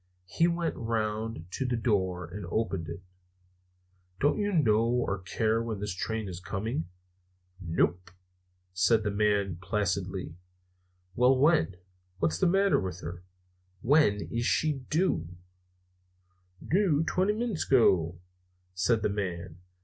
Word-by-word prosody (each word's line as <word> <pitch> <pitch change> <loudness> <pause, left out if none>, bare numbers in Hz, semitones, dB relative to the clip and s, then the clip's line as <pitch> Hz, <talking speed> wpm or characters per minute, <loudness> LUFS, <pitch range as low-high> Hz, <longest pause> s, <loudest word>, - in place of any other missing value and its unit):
He 165 - +2
went 170 -1 -1
round 110 -4 -2
to 135 - -2
the 125 -2 -1
door 95 -6 0
and 90 +2 -7
opened 95 -5 -1
it. 85 +3 -7 1.2
"Don't 145 +7 +2
you 205 0 0
know 115 - +3
or 115 -4 0
care 110 +4 0
when 115 -3 -4
this 105 -1 -3
train 110 +3 -3
is 90 -2 -6
coming?" 95 -1 -3 0.7
"Nope," 90 +1 0 0.6
said 100 +5 +3
the 105 - -1
man 100 -3 +1
placidly. 95 -3 -2 0.8
"Well, 125 +5 +4
when? 130 - +3 0.4
What's 85 -2 0
the - - +3
matter 195 +2 +3
with 90 -2 -5
her? 85 +1 -7 0.6
When 125 -7 +4
is 120 +1 0
she 155 -1 +2 0.2
due?" 90 - 0 1.3
"Doo 170 -5 +3
twenty 190 +5 +1
minits 220 -5 -2
ago," 90 -10 +3 0.5
said 100 +4 +1
the - - +2
man. 90 -4 -4
105 Hz, 125 wpm, -29 LUFS, 90-125 Hz, 1.3 s, Well